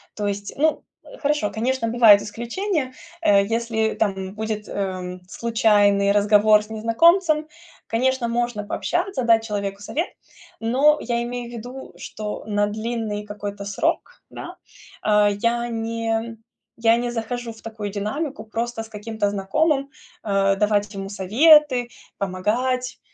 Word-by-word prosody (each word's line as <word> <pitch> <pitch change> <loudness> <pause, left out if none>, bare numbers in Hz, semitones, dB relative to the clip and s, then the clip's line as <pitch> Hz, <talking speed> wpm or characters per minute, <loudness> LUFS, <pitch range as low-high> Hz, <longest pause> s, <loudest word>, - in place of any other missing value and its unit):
То 205 -1 -2
есть, 200 0 -4
ну, 310 +2 +1 0.2
э, - - -13
хорошо, 290 - 0
конечно, 230 +3 -1
бывают 225 -3 +7
исключения. 260 - -3 0.3
Э, 200 -9 +5
если 225 0 -1
там 190 -2 -2
будет, 215 -1 -4
эм, 185 -2 -4
случайный 205 -3 +3
разговор 210 +1 +5
с 210 - -15
незнакомцем, 305 - +3 0.4
конечно, 255 +1 +1
можно 235 -2 -1
пообщаться, 265 - -2
дать 230 -1 +4
человеку 200 -2 -3
совет, 325 - -2 0.5
но 270 +7 +3
я 235 0 -1
имею 240 0 -5
в - - -11
виду, 245 +3 -8
что 210 -1 -6
на 205 -1 +1
длинный 215 -1 -3
какой-то 205 -1 -6
срок, 200 - -2
да, - - -8 0.5
а, 210 -1 +4
я 235 +4 0
не 230 0 -3
м 225 0 -3 0.4
я 230 0 +4
не 240 0 -2
захожу 240 0 -4
в 220 - -17
такую 220 -2 -6
динамику 240 +9 -4
просто 225 +1 -4
с 225 - -13
каким-то 210 -1 -2
знакомым, 275 +9 0 0.4
э, 195 -1 +2
давать 205 0 +1
ему 195 -1 -5
советы, 250 - +4 0.3
помогать. 240 +7 -1
225 Hz, 135 wpm, -22 LUFS, 205-245 Hz, 0.5 s, бывают